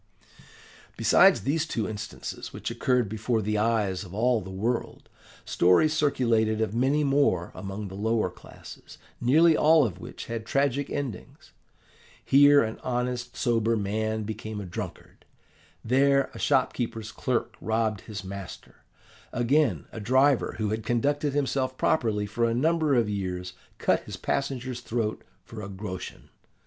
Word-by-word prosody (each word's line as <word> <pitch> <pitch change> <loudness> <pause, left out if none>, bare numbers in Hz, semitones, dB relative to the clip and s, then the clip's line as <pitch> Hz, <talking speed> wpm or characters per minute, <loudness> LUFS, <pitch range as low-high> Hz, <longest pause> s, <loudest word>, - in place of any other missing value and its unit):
"Besides - - +5
these 155 +4 0
two 110 -8 -2
instances 105 - -6
which - - -5
occurred 125 -3 +1
before 110 +3 -1
the 105 0 -1
eyes 105 -4 0
of 95 0 -10
all 120 +1 +2
the 95 - -9
world, 110 +6 -3 0.4
stories 90 - +3
circulated 115 -8 +1
of 110 -2 -1
many 135 +6 +2
more 135 -11 +2
among 100 +1 -6
the 95 - -10
lower 110 -1 0
classes, - - -13 0.2
nearly 155 +7 +5
all 155 -1 +5
of 95 -5 -5
which - - -8
had 115 -1 -4
tragic 140 +1 0
endings. 135 -10 -6 0.7
Here 145 0 +6
an 110 0 -4
honest 125 0 -3
sober 115 -2 +1
man 110 +2 -1
became 110 0 -5
a 100 - -6
drunkard; 90 - -8 0.6
there 140 +3 +3
a - - -9
shopkeeper's 120 -5 0
clerk 125 -3 -2
robbed 110 -2 0
his 105 -2 -7
master; 95 -1 -9 0.5
again, 130 +2 +1
a - - -7
driver 130 +5 +2
who 110 -2 -1
had 110 +1 -2
conducted 145 +5 0
himself 135 -2 -1
properly 110 -8 +1
for 110 +3 -1
a 115 0 0
number 155 +2 +2
of 120 -3 +2
years 90 -3 -4 0.2
cut - - +1
his - - -7
passenger's 130 -3 -2
throat 115 -2 -3 0.2
for 110 -2 -9
a 100 - -7
groschen. 95 -1 -7
115 Hz, 145 wpm, -27 LUFS, 105-135 Hz, 0.7 s, Here